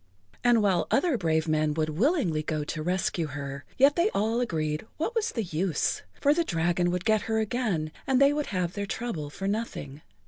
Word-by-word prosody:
And 240 Hz, -3 st, +4 dB
while 190 Hz, -4 st, +2 dB
other 305 Hz, +1 st, +2 dB
brave 160 Hz, -6 st, +1 dB
men 155 Hz, -1 st, +1 dB
would 155 Hz, -1 st, 0 dB
willingly 180 Hz, -, +1 dB
go 155 Hz, -1 st, -2 dB
to 155 Hz, +1 st, -4 dB
rescue 175 Hz, -1 st, 0 dB
her, 140 Hz, -1 st, -6 dB
yet 275 Hz, +2 st, +5 dB
they 350 Hz, +5 st, +3 dB
all 225 Hz, +4 st, +1 dB
agreed 155 Hz, -5 st, -2 dB
what 330 Hz, +10 st, -1 dB
was 460 Hz, -1 st, 0 dB
the 230 Hz, -, -2 dB
use, 170 Hz, -2 st, -1 dB, 0.2 s
for 285 Hz, -, +4 dB
the 340 Hz, +2 st, +1 dB
dragon 175 Hz, -, +1 dB
would 180 Hz, 0 st, -2 dB
get 215 Hz, -1 st, +3 dB
her 220 Hz, -, +1 dB
again 215 Hz, -8 st, -1 dB, 0.2 s
and 265 Hz, -1 st, +3 dB
they 275 Hz, +1 st, +6 dB
would 295 Hz, 0 st, -2 dB
have 180 Hz, -2 st, -1 dB
their 200 Hz, -1 st, -3 dB
trouble 195 Hz, -11 st, -4 dB
for 195 Hz, +6 st, -5 dB
nothing. 200 Hz, -9 st, -4 dB
185 Hz, 200 wpm, -27 LUFS, 155-240 Hz, 0.2 s, they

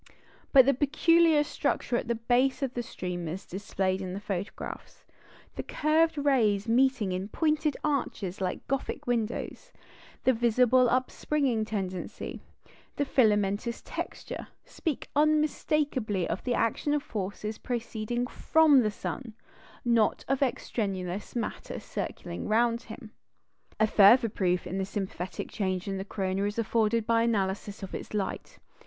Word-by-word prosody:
But 265 Hz, -3 st, +8 dB
the 275 Hz, -, +4 dB
peculiar 310 Hz, +3 st, +4 dB
structure 255 Hz, -, -1 dB
at 240 Hz, -, -1 dB
the 235 Hz, -, +1 dB
base 250 Hz, +5 st, +1 dB
of 260 Hz, -2 st, -1 dB
the 240 Hz, -, -2 dB
streamers 180 Hz, -4 st, -5 dB
displayed 190 Hz, 0 st, -2 dB
in 185 Hz, -1 st, -4 dB
the -, -, -4 dB
photographs, 200 Hz, -1 st, -6 dB, 0.5 s
the -, -, -1 dB
curved 315 Hz, +1 st, +2 dB
rays 235 Hz, -8 st, +2 dB
meeting 245 Hz, -3 st, +3 dB
in 185 Hz, +2 st, -2 dB
pointed 305 Hz, +4 st, 0 dB
arches 230 Hz, -10 st, -2 dB
like 185 Hz, -, -3 dB
Gothic 275 Hz, -1 st, -2 dB
windows, 240 Hz, -, -2 dB, 0.5 s
the 260 Hz, -, +4 dB
visible 245 Hz, +2 st, +4 dB
upspringing 255 Hz, -1 st, 0 dB
tendency, 190 Hz, -4 st, -4 dB, 0.5 s
the 285 Hz, -, 0 dB
filamentous 210 Hz, -2 st, +1 dB
texture, -, -, -6 dB, 0.2 s
speak 315 Hz, -6 st, -4 dB
unmistakably 295 Hz, -, +1 dB
of -, -, -3 dB
the 245 Hz, -2 st, +1 dB
action 260 Hz, +6 st, +1 dB
of 290 Hz, -, -1 dB
forces 210 Hz, +1 st, -4 dB
proceeding 240 Hz, 0 st, -2 dB
from 310 Hz, +2 st, +4 dB
the 220 Hz, -4 st, +2 dB
sun, 225 Hz, +2 st, -6 dB, 0.5 s
not 235 Hz, -2 st, +2 dB
of 270 Hz, +1 st, 0 dB
extraneous 200 Hz, -7 st, -2 dB
matter 235 Hz, -3 st, -4 dB
circling 85 Hz, -, -5 dB
round 230 Hz, +2 st, +2 dB
him. 220 Hz, -1 st, -10 dB, 0.7 s
A 220 Hz, -, +5 dB
further 220 Hz, +3 st, +6 dB
proof 180 Hz, -3 st, 0 dB
of 190 Hz, +1 st, -3 dB
sympathetic 190 Hz, -3 st, -5 dB
change 185 Hz, -2 st, -2 dB
in 195 Hz, -1 st, -2 dB
the 190 Hz, -, -4 dB
corona 195 Hz, -1 st, -1 dB
is 205 Hz, +1 st, -3 dB
afforded 230 Hz, 0 st, +1 dB
by 230 Hz, 0 st, +3 dB
the 230 Hz, -, +3 dB
analysis 200 Hz, -1 st, -2 dB
of 190 Hz, -, -7 dB
its -, -, -6 dB
light. 200 Hz, -2 st, -3 dB
230 Hz, 135 wpm, -28 LUFS, 195-260 Hz, 0.7 s, But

